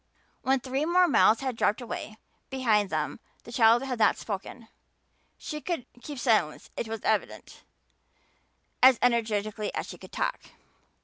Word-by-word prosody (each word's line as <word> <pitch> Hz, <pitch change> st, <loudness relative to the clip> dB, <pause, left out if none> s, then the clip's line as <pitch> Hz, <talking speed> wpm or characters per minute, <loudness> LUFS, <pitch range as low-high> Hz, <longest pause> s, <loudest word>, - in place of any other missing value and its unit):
When 265 Hz, 0 st, +2 dB
three 265 Hz, +3 st, -2 dB
more 355 Hz, +3 st, +4 dB
miles 230 Hz, -6 st, +4 dB
had 260 Hz, -3 st, -2 dB
dropped 215 Hz, 0 st, +1 dB
away 220 Hz, -2 st, -6 dB, 0.3 s
behind 220 Hz, -7 st, +1 dB
them 155 Hz, +5 st, -2 dB, 0.2 s
the 235 Hz, -, -11 dB
child 230 Hz, +1 st, +5 dB
had 255 Hz, -3 st, -4 dB
not -, -, +4 dB
spoken. 220 Hz, +3 st, -6 dB, 0.7 s
She 300 Hz, -1 st, -6 dB
could 335 Hz, -8 st, -3 dB, 0.2 s
keep 290 Hz, +1 st, -7 dB
silence, 220 Hz, -, +1 dB
it 230 Hz, -, -3 dB
was 225 Hz, -1 st, -5 dB
evident, -, -, -2 dB, 1.2 s
as 260 Hz, -1 st, +8 dB
energetically 215 Hz, -3 st, 0 dB
as -, -, -2 dB
she -, -, -9 dB
could -, -, -13 dB
talk. -, -, -2 dB
235 Hz, 145 wpm, -28 LUFS, 215-265 Hz, 1.2 s, as